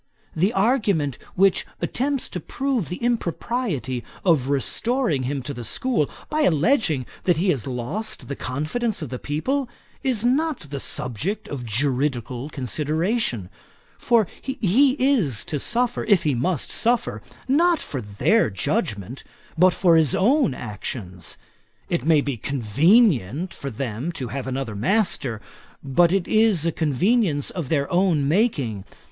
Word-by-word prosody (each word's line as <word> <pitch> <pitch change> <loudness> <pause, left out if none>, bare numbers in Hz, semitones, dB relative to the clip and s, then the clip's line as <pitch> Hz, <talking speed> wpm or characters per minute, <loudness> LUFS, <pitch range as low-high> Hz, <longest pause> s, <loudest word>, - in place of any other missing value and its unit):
The 185 +6 +2
argument 195 - +1 0.2
which 195 0 +3 0.2
attempts 275 +1 -1
to 180 - -4
prove 260 - -2
the 180 - -3
impropriety 190 - -2 0.2
of 150 -7 +3
restoring 155 - 0
him 140 -2 -3
to 140 +2 -5
the 120 -2 -7
school, 185 - 0 0.2
by 310 +1 -1
alledging 165 - +2 0.2
that 180 -3 +3
he 185 +4 +1
has 135 -7 -3
lost 130 - -4
the 140 - -4
confidence 155 - -2
of 145 - -6
the 125 0 -5
people, 255 - -2 0.3
is 245 -5 +1
not 295 +4 +1
the 140 - -3
subject 135 - -2
of 125 -4 -5
juridical 130 +1 -1
consideration; 150 - -1 0.5
for 230 -5 +3
he 260 +1 +2
is 220 - +2
to 150 - -2
suffer, 240 - +1
if 205 -5 +4
he 150 - +1
must 140 +5 -1
suffer, 240 +1 0 0.3
not 335 +6 +4
for 135 - -5
their 105 - +2
judgement, 105 +4 -2 0.3
but 180 +3 +6
for 175 -1 +3
his 155 -5 +3
own 240 - +3
actions. 100 -5 -6 0.5
It - - 0
may 155 -1 +4
be 140 -3 -3
convenient 140 - +2
for 140 - -6
them 125 +4 -4
to 130 -6 -5
have 135 +2 -4
another 130 -4 -3
master; 125 - 0 0.4
but 155 +5 +3
it 195 -2 +1
is 215 -7 +3
a 165 - +2
convenience 160 - +1
of 165 -8 -5
their 140 -3 +1
own 175 -6 +2
making. 145 - +1
160 Hz, 140 wpm, -23 LUFS, -, 0.5 s, but